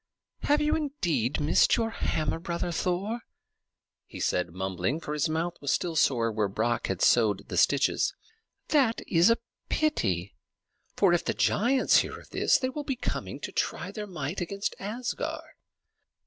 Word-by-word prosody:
"Have 295 +1 +2
you 300 0 +2
indeed 175 - -1
missed 150 +9 +4
your 225 -1 0
hammer, 155 -7 -1
brother 170 0 -3
Thor?" 185 +7 -1 0.9
he - - -9
said, 90 -1 0
mumbling, 95 - -2
for 150 - -5
his 150 0 0
mouth 165 +2 -2
was 140 - 0
still 170 -2 0
sore 120 -6 +2
where 105 -1 0
Brock 120 +4 -1
had 95 -2 -1
sewed 110 -5 +3
the - - -4
stitches. - - +2 0.5
"That 265 -7 +3
is 170 +3 +5
a 230 - +4 0.3
pity; 100 - 0 0.6
for 190 -4 +4
if 175 - +2
the - - -1
giants 255 +5 +3
hear - - 0
of - - -18
this, - - +3
they 255 - -1
will 295 +3 -5
be 275 -2 -2
coming 250 - -4
to - - -5
try - - -2
their 210 -2 -6
might 170 -1 -4
against 195 +3 -2
Asgard." 230 +5 -4
170 Hz, 160 wpm, -28 LUFS, -, 0.9 s, is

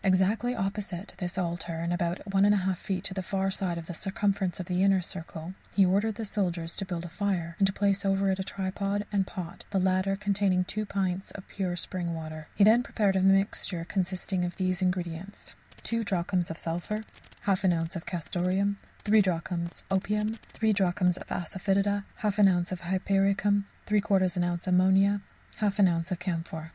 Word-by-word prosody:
Exactly 200 +6 +2
opposite 195 -2 -3
this 180 0 -3
altar, 170 -2 -2
and 170 +1 -1
about 175 +1 -1
1 195 0 +5
1/2 195 -2 +3
feet 190 -3 -3
to 195 - -1
the 190 - -2
far 195 +1 -1
side 180 -3 -1
of 165 - -6
the 175 - -6
circumference 195 +1 -1
of 185 - -3
the 180 +1 0
inner 195 -1 +5
circle, 170 -1 -6 0.2
he 195 - +6
ordered 200 +4 +2
the 225 - -4
soldiers 175 -5 -1
to 195 - -3
build 175 -2 -4
a - - -4
fire, 180 -2 -1
and 195 - +5
to 190 - -1
place 200 -1 +1
over 195 0 +2
it 190 - -1
a - - 0
tripod 200 +1 -2
and 195 -2 +1
pot, 180 -2 -7
the 200 - 0
latter 185 +1 +2
containing 195 -2 +1
two 215 +3 -3
pints 190 -1 -1
of 190 - -10
pure 185 -3 -2
spring 175 -2 -3
water. 155 -1 -7
He 205 - +5
then 220 +4 +7
prepared 205 -5 +1
a 190 - +3
mixture 195 -2 +2
consisting 185 0 -1
of 175 0 -3
these 185 -1 0
ingredients: 180 +1 -3 0.3
2 230 0 -1
drachms 180 -2 0
of 165 - -5
sulphur. 175 +7 -2 0.4
1/2 190 -2 +3
oz. 165 +2 -1
of 170 - -6
castoreum. 185 +3 0 0.3
6 215 0 +6
drachms 170 -2 -2
of 195 - +4
opium. 210 +3 -1
3 220 -1 +2
drachms 180 -2 +2
of - - -9
asafœtida. 195 +3 0 0.2
1/2 210 -1 +4
oz. 175 - -3
of 185 - -3
hypericum. 195 +3 +1 0.2
3/4 205 -2 +3
oz. 180 -2 0
of 175 0 -1
ammonia. 190 +2 +4 0.4
1/2 205 -2 +4
oz. 170 +1 0
of 180 - 0
camphor. 165 -3 -4
190 Hz, 185 wpm, -29 LUFS, 175-200 Hz, 0.4 s, then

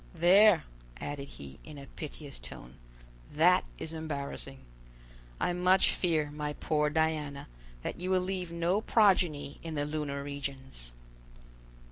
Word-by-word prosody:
There," 190 +3 +6 0.4
added 145 -1 -5
he, 70 - -11
in 155 -2 -10
a 140 - -9
piteous 145 0 -8
tone, 60 +2 -10 0.6
"that - - +4
is 160 - -6
embarrassing. 140 -3 -5 0.8
I 175 - +1
much 180 +2 +4
fear, 155 -5 0
my 150 0 -3
poor 150 0 +1
Diana, 150 -2 -1 0.4
that - - -4
you 185 - -2
will 185 -1 +3
leave 180 -2 -3
no 170 +4 +1
progeny 180 -11 +3
in 165 -1 -5
the 145 -1 0
lunar 145 -2 -3
regions!" 135 - -6
150 Hz, 130 wpm, -31 LUFS, 140-175 Hz, 0.8 s, There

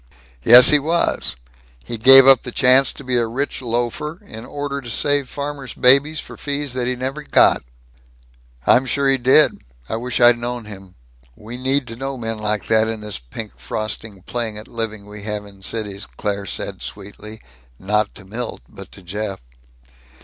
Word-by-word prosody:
"Yes. 125 +2 +9
He 150 - +5
was. 165 - 0 0.5
He 115 - -6
gave 135 +3 +9
up 135 -2 +7
the 125 - -6
chance 130 +1 +4
to - - -12
be 125 -1 -1
a 120 -1 +1
rich 135 +4 -3
loafer 120 +6 -3
in 110 +2 -10
order 145 -1 -5
to 120 - -9
save 145 +3 0
farmers' 140 -2 -6
babies 140 +4 +4
for - - -9
fees 145 -2 -3
that 125 -1 -2
he 125 - -1
never 130 +4 -4
got." 150 - +3 1.0
"I'm 130 +1 +4
sure 140 +3 +1
he 135 -1 +2
did. 130 +5 +4 0.3
I - - -3
wish 125 +1 -3
I'd 120 0 +6
known 120 -1 -5
him. 95 -3 -11 0.4
We 110 +3 -10
need 130 +2 0
to 115 -1 -7
know 135 +2 -5
men 115 -2 -4
like 105 -2 -1
that 110 0 +2
in 110 -1 -4
this 105 -7 -5
pink 100 - -9
frosting 110 -2 -6
playing 115 -2 -3
at 105 - -8
living 110 -3 -5
we 105 0 -11
have 105 0 -4
in 100 -1 -16
cities," 105 -1 -3
Claire 100 -2 -4
said - - -5
sweetly 105 +2 -9 0.4
not 105 - -1
to 95 - -12
Milt 115 +4 -6
but 100 -3 -13
to 95 - -13
Jeff. 100 +2 -5
120 Hz, 180 wpm, -20 LUFS, 105-135 Hz, 1.0 s, Yes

